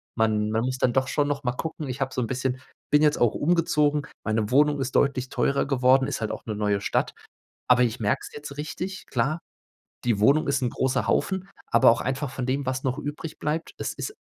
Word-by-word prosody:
Man 110 -1 +1
man 110 +1 +1
muss 130 0 -2
dann 120 - +2
doch 130 -1 +2
schon 145 -1 +1
noch 145 -2 -2
mal 125 0 0
gucken. 160 -1 -5
Ich 130 +2 -5
habe 135 0 -1
so 125 - -1
'n 115 - -1
bisschen 130 0 -2 0.3
bin 150 0 +5
jetzt 150 -1 +4
auch 120 -3 +3
umgezogen. 150 -2 +2 0.2
Meine 110 -1 0
Wohnung 145 +1 +4
ist 130 0 -3
deutlich 130 -2 +2
teurer 140 0 +1
geworden. 130 0 +4
Ist - - -3
halt 110 - -1
auch - - -7
'ne 110 - -2
neue 105 -1 0
Stadt. - - 0 0.5
Aber 125 0 +5
ich 115 -1 -1
merke 105 -1 0
es - - -15
jetzt 145 -1 -8
richtig. 180 +5 -5
Klar, 135 +7 0 0.7
die 115 -4 +1
Wohnung 140 +6 +4
ist 140 -1 +1
'n 125 - +2
großer 130 0 0
Haufen, 190 0 0 0.2
aber 115 - +6
auch 115 - +2
einfach 135 +2 -2
von 130 - -4
dem, 135 +1 -1
was 130 0 -1
noch 130 +2 -1
übrig 150 +2 -6
bleibt. 155 +2 -2
Es - - -3
ist 420 - -5
130 Hz, 225 wpm, -25 LUFS, 120-150 Hz, 0.7 s, aber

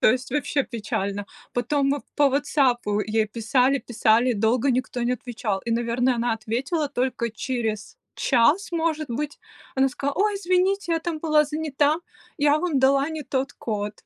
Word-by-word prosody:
То - - +6
есть 255 0 -3
вообще 290 0 0
печально. 205 -3 -3 0.3
Потом 275 +3 +1
мы 285 +1 0 0.2
по 285 -1 +5
"Ватсапу" 260 -6 +1
ей 215 +1 0
писали, 250 +5 +2
писали, 235 +1 +2
долго 230 +5 +2
никто 250 0 -1
не 240 +1 +1
отвечал. 230 -5 -3
И, 235 - -3
наверно, 240 +2 +1
она 235 0 0
ответила 260 +8 -2
только 245 -3 -1
через 220 -3 -3 0.2
час, 275 +10 +2
может 320 -3 -1
быть. 290 +5 -4 0.4
Она 270 0 +3
сказала: 280 +2 -3
"Ой, 415 +1 +2
извините, 370 -1 +1
я 330 - +2
там 325 -1 -3
была 305 -1 +3
занята. 300 0 0 0.4
Я 295 0 +4
вам 330 -4 0
дала 275 +2 +3
не 315 -1 -5
тот 265 0 -2
код". 210 -2 -3
260 Hz, 160 wpm, -24 LUFS, 230-295 Hz, 0.4 s, То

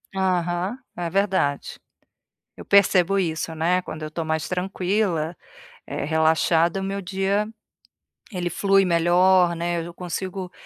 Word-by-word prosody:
Aham, 180 +2 0 0.2
é 175 -1 -3
verdade. 190 -6 0 0.8
Eu - - -10
percebo 195 -1 +4
isso, 165 -2 -2
né, 175 +3 +1
quando 155 -3 -8
eu 155 - -4
estou 160 +1 -4
mais 160 -1 -2
tranquila, 180 -2 -1 0.5
eh, - - -4
relaxada, 160 +3 +2
o - - -4
meu 195 +1 -3
dia 195 +3 -1 0.8
ele 175 -2 -2
flui 195 +2 +3
melhor, 175 +1 +3
né, 170 0 -2
eu 170 0 -9
consigo 180 +1 -5
180 Hz, 130 wpm, -23 LUFS, 165-190 Hz, 0.8 s, percebo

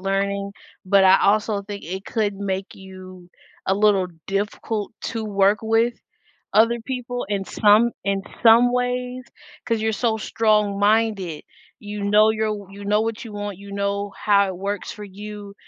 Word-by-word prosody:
learning, 200 +1 -1 0.4
but 195 0 +5
I 190 +1 +6
also 210 0 +2
think 200 -2 -8
it 190 +4 -6
could 210 -3 -1
make 195 -1 -4
you 185 -2 -12 0.4
a 190 - +2
little 200 -2 +3 0.2
difficult 205 +2 -3
to 225 - -3
work 200 0 +2
with 225 +2 +2 0.6
other 230 +2 +4
people 245 -3 -4
in 200 -2 -1
some 215 +4 +4
in 195 -1 0 0.2
some 235 +2 +6
ways 250 0 -2 0.4
'cause 230 -2 0
you're 220 0 +1
so 225 0 0
strong-minded, 210 -4 +1 0.4
you 205 0 -6
know 210 +2 +5
you're 220 0 -1
w 205 -2 -4
you 200 +1 -10
know 210 +1 +2
what 225 +1 -3
you 220 - -9
want, 205 -2 -5
you 200 0 -11
know 200 0 -2
how 200 -1 +3
it 185 - -5
works 200 +1 -4
for 210 -1 -9
you 205 0 -9
205 Hz, 160 wpm, -22 LUFS, 195-220 Hz, 0.6 s, I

